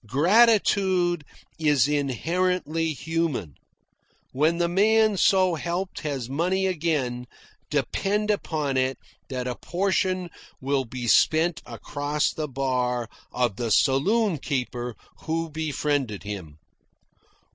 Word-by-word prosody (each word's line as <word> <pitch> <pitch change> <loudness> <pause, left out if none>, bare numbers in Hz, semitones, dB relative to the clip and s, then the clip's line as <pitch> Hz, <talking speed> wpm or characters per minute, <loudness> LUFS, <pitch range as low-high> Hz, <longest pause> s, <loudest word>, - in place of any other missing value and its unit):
Gratitude 185 - +3 0.4
is 145 -5 +3
inherently 165 +4 0
human. 155 - -2 0.8
When 155 +5 +2
the 170 0 +1
man 215 +4 +3
so 185 -1 +3
helped 175 +4 -3
has 140 -6 -3
money 180 +8 0
again, 150 -9 -1 0.4
depend 210 +2 0
upon 150 -9 -1
it 130 0 +1 0.3
that 130 -2 -3
a 125 - -2
portion 185 +2 -1 0.3
will 135 0 0
be 120 0 -6
spent 160 +7 +3
across 145 +1 -2
the 155 -1 -3
bar 125 -3 -1 0.2
of 120 -5 0
the 120 -2 -2
saloon 170 - +2
keeper 125 -4 -3 0.3
who 165 0 -2
befriended 145 -7 -2
him. 95 -8 -7
155 Hz, 105 wpm, -25 LUFS, 130-180 Hz, 0.8 s, Gratitude